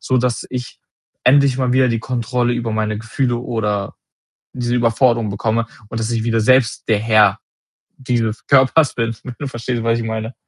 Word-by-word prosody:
sodass 125 -2 0
ich 125 -1 -6 0.5
endlich 135 -1 +4
mal 125 -2 +1
wieder 130 -1 +4
die 115 -1 0
Kontrolle 120 +1 -1
über 120 -2 -3
meine 110 -1 -1
Gefühle 120 +3 -1
oder 105 -5 -3 0.6
diese 120 -1 -2
Überforderung 115 -1 +2
bekomme 110 +3 -1 0.2
und 115 - -4
dass 110 +1 -2
ich 115 -1 -1
wieder 115 -1 +1
selbst 130 +1 +2
der 110 -2 +3
Herr 110 -2 +3 0.6
dieses 115 -4 -2
Körpers 140 +2 +4
bin. 115 -1 -1
Wenn 125 - -7
du 145 - -4
verstehst, 120 -1 -4
was 115 0 +1
ich 115 - -4
meine. 110 +2 -4
115 Hz, 170 wpm, -18 LUFS, 110-125 Hz, 0.6 s, endlich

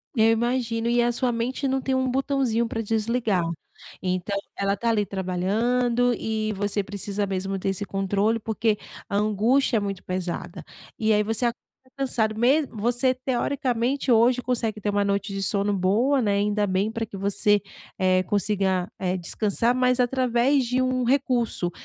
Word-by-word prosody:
Eu 220 -1 +4
imagino 235 0 0
e 240 0 +3
a 240 0 +2
sua 245 +1 0
mente 245 +4 -2
não 265 0 0
tem 265 0 0
um 260 0 +1
botãozinho 260 -3 0
para 225 0 -3
desligar. 220 -2 0 0.6
Então 185 +2 -2 0.2
ela 200 0 0
está 215 +4 -1
ali 220 -2 +2
trabalhando 230 +7 0
e 220 -1 -2
você 205 +1 -1
precisa 200 0 -3
mesmo 195 0 -2
ter 190 - -3
esse 195 +1 -3
controle, 200 +3 0
porque 220 0 0 0.3
a 200 - -3
angústia 220 +5 +2
é - - +2
muito 200 -2 -4
pesada, 180 0 -4 0.3
e 220 0 +2
aí 210 - +3
você 225 +3 0 0.5
cansado 230 -5 0
mesmo. 270 +4 +2
Você 245 +3 +2
teoricamente 255 0 -1
hoje 240 +2 +4
consegue 230 -3 -2
ter 210 - -2
uma 205 0 +1
noite 200 +1 -1
de 195 - -3
sono 200 0 0
boa, 225 +10 +2
né. 205 -3 +1
Ainda 205 0 +1
bem 190 +2 0
para 225 0 -3
que 205 - -9
você 205 +1 +2 0.4
é 185 -1 +3
consiga 190 -1 0
é 185 0 -1
descansar, 215 +7 0
mas 250 0 +2
através 255 +2 +2
de 250 +2 0
um 255 -1 0
recurso 245 -8 +1
220 Hz, 165 wpm, -25 LUFS, 200-245 Hz, 0.6 s, Eu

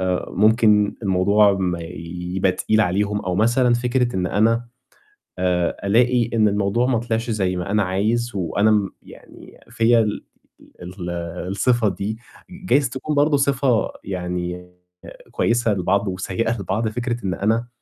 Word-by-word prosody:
آآ 90 -1 -1
ممكن 105 0 +3
الموضوع 100 +2 +3
ما 90 -3 -1
يبقى 90 +2 -3
تقيل 110 +4 +1
عليهم 105 +2 0
أو 90 -1 -3
مثلًا 120 +4 +3
فكرة 120 -2 0
إن 90 -1 0
أنا 115 +5 +1 0.7
آآ 90 -2 0
ألاقي 120 +2 +3
إن 110 -2 +3
الموضوع 105 +4 +1
ما 125 - +1
طلعش 115 0 -2
زي 95 -4 0
ما 90 +3 -4
أنا 105 -1 +2
عايز، 110 +6 -1
وأنا 100 +4 +1
م 105 -2 +2
يعني - - -15
فيّا 115 +1 +3
ال 105 -2 -1 0.6
ال 90 0 -7 0.4
الصفة 110 +3 +1
دي، 100 +4 -4 0.3
جايز 180 -8 0
تكون 135 +4 -4
برضه 145 0 +3
صفة 135 -4 +1
يعني 90 -1 -5 0.6
كويسة 115 -2 +1
لبعض 100 +2 0
وسيّئة 95 +5 -2
لبعض، 105 +4 -1
فكرة 120 0 -4
إن 95 - -1
أنا 115 +5 0
105 Hz, 140 wpm, -21 LUFS, 95-120 Hz, 0.7 s, ممكن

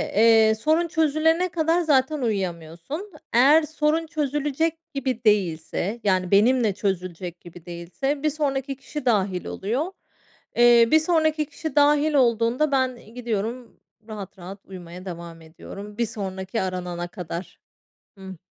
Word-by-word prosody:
eee, 220 0 +5
sorun 315 +9 +1
çözülene 320 +2 +2
kadar 330 0 +1
zaten 290 -2 +2
uyuyamıyorsun. 190 - -4 0.2
Eğer 285 +7 +6
sorun 310 +1 0
çözülecek 310 +2 -2
gibi 260 -4 -2
değilse, 200 +1 0
yani, 185 -3 +1
benimle 220 +2 +4
çözülecek 180 -3 -3
gibi 175 -1 -13
değilse, 180 - -4
bir 305 - +3
sonraki 275 -2 -2
kişi 290 +2 -7
dâhil 195 -6 +1
oluyor. 255 - -2 0.6
Eee, 240 -1 +6
bir 315 - +7
sonraki 315 -2 +1
kişi 300 0 -7
dâhil 295 +1 +4
olduğunda, 245 +2 +2
ben 255 -4 -1
gidiyorum 235 0 -4 0.3
rahat 205 -3 -8
rahat 190 +3 -9
uyumaya 180 -1 -10
devam 170 -2 -8
ediyorum. 200 +6 -11
Bir 235 - +1
sonraki 190 0 -4
aranana 180 -2 -3
kadar. 175 -1 -7 0.6
Hıı. 190 -2 -9
235 Hz, 125 wpm, -24 LUFS, 190-300 Hz, 0.6 s, bir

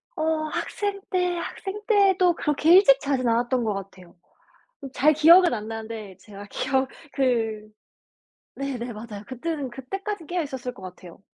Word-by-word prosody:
어 315 0 0
학생 405 -1 -3
때, 360 -2 0
학생 390 +4 -6
때도 390 -4 +4
그렇게 300 +2 +2
일찍 355 -8 +7
자진 275 -4 -1
않았던 240 +2 +1
것 215 -2 0
같아요. 190 -3 -9 0.8
잘 300 +4 +4
기억은 335 +1 +6
안 215 -1 -5
나는데 220 -3 -7
제가 200 +1 -12
기억 265 0 0 0.2
그 225 -5 -1 0.9
네네 250 -3 -4
맞아요. 210 -1 -8
그때는 275 +2 -4
그때까지 345 +9 -6
깨어있었을 270 -8 -4
것 195 - -15
같아요. 180 -1 -11
265 Hz, 295 characters per minute, -24 LUFS, 225-335 Hz, 0.9 s, 일찍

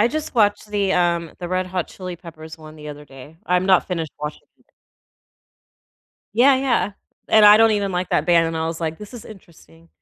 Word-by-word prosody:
I 220 - +5
just 305 +4 -4
watched 210 -1 +1
the, 200 -2 0
um, 170 -2 0
the 175 - -5
Red 185 0 -1
Hot 180 -2 -3
Chili 185 -2 -8
Peppers 160 -2 -12
one 155 0 -13
the 150 0 -11
other 150 0 -9
day. 140 +3 -14
I'm 180 +1 +1
not 190 -2 +3
finished 165 -5 -4
watching 150 0 -6 0.2
it. - - -31 1.7
Yeah, 265 +4 +5
yeah, 255 -6 0 0.4
and 215 -1 +5
I 210 0 +9
don't 225 0 +5
even 200 -2 0
like 180 0 -3
that 150 - +1
band, 170 -2 +4
and 165 0 -4
I 160 - -2
was, 165 0 -5
like, 160 -1 -3
"This 210 +4 -11
is 235 - -10
interesting." 170 -4 -17
180 Hz, 210 wpm, -21 LUFS, 160-205 Hz, 1.7 s, I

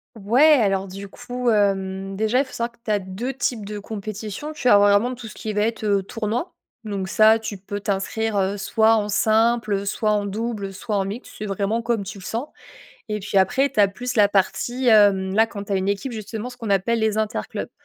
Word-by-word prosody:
Ouais, 240 +9 +5
alors 195 -2 +1
du 195 +1 -8
coup, 245 +3 -3
hem, 195 -2 0
déjà 220 +5 +1
il 280 - +2
faut 260 - -15
savoir 235 0 -2
que 240 - -29
tu - - -6
as 210 -1 +2
2 195 +8 -5
types 245 -5 -2
de 210 +1 -6
compétition. 215 +6 -6
Tu 275 -5 0
as 205 - +8
vraiment 205 +4 +4
tout 245 -2 -9
ce - - -10
qui 220 - -4
va 210 - -1
être, 225 0 -2
heu, 200 -2 +2
tournoi, 225 - -3 0.3
donc 195 -3 -3
ça 220 +2 +5
tu 220 -2 -6
peux 205 +2 -6
t'inscrire, 205 +2 -1
heu, 195 +1 +1
soit 220 +2 +3
en 210 -1 -1
simple, 220 +1 +2
heu, 200 0 -1
soit 215 +1 0
en 205 -1 +1
double, 210 0 -3
heu, - - -9
soit 205 +3 -4
en 195 - +1
mixte, 200 +6 -7
c'est 215 - -5
vraiment 200 +3 -1
comme 230 -3 -1
tu 200 +1 -8
le - - -12
sens. 230 +8 -3 0.6
Et 210 0 -2
puis 200 0 0
après 265 +9 +2
tu 235 - +1
as 200 - +6
plus 245 +5 -5
la 205 -2 +6
partie, 205 +6 0
hem, 200 -3 +5
là 220 +2 +5
quand 205 -3 -7
tu 200 - -5
as - - +2
une 190 +1 -1
équipe 200 +6 -2
justement, 220 +2 -6
ce 245 - -13
qu'on 230 - -5
appelle 200 +4 +1
les 220 -1 +1
interclubs. 220 +1 -3
210 Hz, 235 wpm, -22 LUFS, 200-230 Hz, 0.6 s, as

